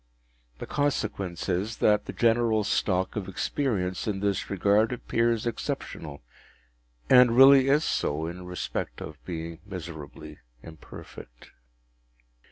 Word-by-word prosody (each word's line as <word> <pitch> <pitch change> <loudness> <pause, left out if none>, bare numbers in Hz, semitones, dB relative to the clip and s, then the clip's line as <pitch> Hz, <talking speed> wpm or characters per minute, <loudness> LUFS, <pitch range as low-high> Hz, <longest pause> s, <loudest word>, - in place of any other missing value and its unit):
The - - -7
consequence 105 - -2
is, 100 +4 -1
that 105 -1 +2
the - - -5
general 115 -2 +2
stock 95 -2 0
of 100 -3 -4
experience 95 -2 -2
in 100 -2 -1
this 100 -1 -1
regard 100 +3 +2
appears 115 -2 0
exceptional, 80 - -5 0.8
and 125 -2 +6
really 135 0 +8
is 145 +3 +3
so, 75 - -1
in 90 +2 -7
respect 90 0 -4
of 75 -2 -9
being 85 -1 -6
miserably 80 -5 -9 0.2
imperfect. 80 -6 -12
100 Hz, 115 wpm, -27 LUFS, 85-115 Hz, 0.8 s, really